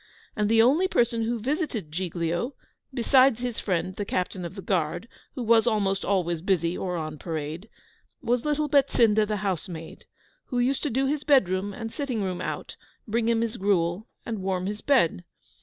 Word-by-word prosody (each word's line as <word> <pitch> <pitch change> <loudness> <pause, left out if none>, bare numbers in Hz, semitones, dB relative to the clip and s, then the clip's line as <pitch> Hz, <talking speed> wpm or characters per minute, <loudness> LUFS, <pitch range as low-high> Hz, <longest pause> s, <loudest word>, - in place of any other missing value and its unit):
And 210 -1 +1
the 225 0 +6
only 305 +10 +4
person 235 -7 +1
who 235 +1 -1
visited 250 - -2
Giglio 175 - -2 0.4
(beside 260 0 +4
his 245 -1 -3
friend 185 -1 -1
the 205 - -1
Captain 185 -1 -2
of 170 - -7
the 195 - -7
Guard, 175 +2 -1 0.3
who 255 - -3
was 230 +1 +4
almost 200 -4 +1
always 175 -4 0
busy 175 -2 +1
or 180 -2 -3
on 155 -2 -5
parade) 160 +4 -5 0.5
was 240 0 0
little 300 0 0
Betsinda 235 -7 +4
the 210 0 -1
housemaid, 170 -3 -4 0.4
who 250 - -4
used 255 +3 +1
to 295 - -1
do 265 +2 +1
his 290 +1 -1
bedroom 200 - +3
and 225 +2 -6
sitting 255 -8 -2
room 180 -2 -3
out, - - -5 0.3
bring 230 +1 +1
him 230 -1 +2
his 230 0 -2
gruel, 190 +1 +1 0.2
and 220 -4 -4
warm 185 -1 -1
his 210 +2 -4
bed. 170 - +2
210 Hz, 175 wpm, -26 LUFS, 180-245 Hz, 0.5 s, the